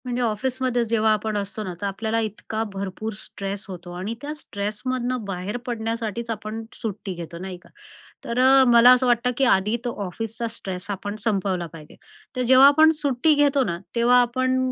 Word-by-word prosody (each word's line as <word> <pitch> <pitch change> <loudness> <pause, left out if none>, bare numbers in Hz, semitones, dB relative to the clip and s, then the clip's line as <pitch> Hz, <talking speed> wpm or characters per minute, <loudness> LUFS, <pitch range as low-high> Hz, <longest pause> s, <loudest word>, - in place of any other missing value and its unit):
म्हणजे 250 0 -2
ऑफिसमध्ये 245 +2 0
जेव्हा 220 -1 +2
आपण 215 0 -2
असतो 205 +2 -4
ना, 185 -3 -5
तर - - -2
आपल्याला 220 +3 -1
इतका 220 0 -3
भरपूर 195 +3 -4
स्ट्रेस 200 -1 -6
होतो 175 -1 -8
आणि 195 +5 -3
त्या 295 +1 -4
स्ट्रेसमधनं 245 +1 -3
बाहेर 195 +3 -4
पडण्यासाठीच 230 -1 -3
आपण 215 0 -4
सुट्टी 205 -3 -5
घेतो. 170 -1 -8
नाही 185 +1 -6
का. - - -20 0.6
तर 235 +1 -2
अ, 265 +1 +7
मला 235 +1 +8
असं 255 +1 +2
वाटतं 245 +1 +2
की 270 - +3
आधी 195 +4 +1
तो 240 - -1
ऑफिसचा 225 +5 -4
स्ट्रेस 185 +1 -6
आपण 205 +1 -4
संपवला 190 -5 0
पाहिजे. 155 -2 -12 0.4
तर 255 - -1
जेव्हा 260 +2 +7
आपण 315 +3 +6
सुट्टी 285 +2 +3
घेतो 285 -1 +3
ना, 170 -7 -2 0.2
तेव्हा 240 +1 +5
आपण 255 +2 0
225 Hz, 175 wpm, -23 LUFS, 200-250 Hz, 0.6 s, मला